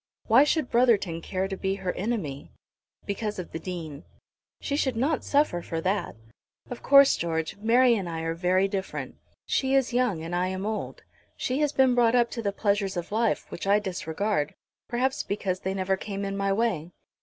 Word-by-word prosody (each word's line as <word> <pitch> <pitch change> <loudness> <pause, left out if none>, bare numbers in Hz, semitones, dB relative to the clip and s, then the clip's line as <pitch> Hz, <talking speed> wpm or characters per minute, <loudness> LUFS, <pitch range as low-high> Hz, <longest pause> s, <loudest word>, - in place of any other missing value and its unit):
"Why 240 +5 +6
should 295 -2 0
Brotherton 215 -9 +3
care 185 +3 -2
to 195 - -4
be 190 0 -1
her 190 -2 -3
enemy?" 185 - -3 0.6
"Because 210 +1 -3
of 180 - -6
the 165 - -5
Dean." 165 -4 -6 0.6
"She 285 - -2
should 265 -4 0
not 280 +6 0
suffer 285 -12 +1
for 165 -1 -4
that. 185 +2 -1 0.6
Of 245 - -6
course, 275 0 +7
George, 160 0 -2
Mary 240 +4 +4
and 195 -6 -2
I 165 -1 -4
are 165 0 -2
very 185 +3 +2
different. 195 -1 -5 0.3
She 265 0 +1
is 265 -2 +2
young 240 -10 +1
and 170 +2 -4
I 180 +1 +1
am 190 +1 -3
old. 215 0 -4 0.3
She 255 +2 -1
has 295 -2 +2
been 265 -3 +4
brought 240 -1 +3
up 240 -1 +3
to 230 - -4
the 200 -3 -1
pleasures 200 -1 0
of 175 +2 -5
life, 225 +1 +1
which 185 - -6
I 200 +1 +5
disregard, 185 -3 -2 0.3
perhaps 255 +2 0
because 195 -2 -2
they 190 +1 -3
never 190 0 0
came 200 0 -5
in 195 0 -3
my 195 0 0
way. 195 -6 0
200 Hz, 190 wpm, -27 LUFS, 180-240 Hz, 0.6 s, course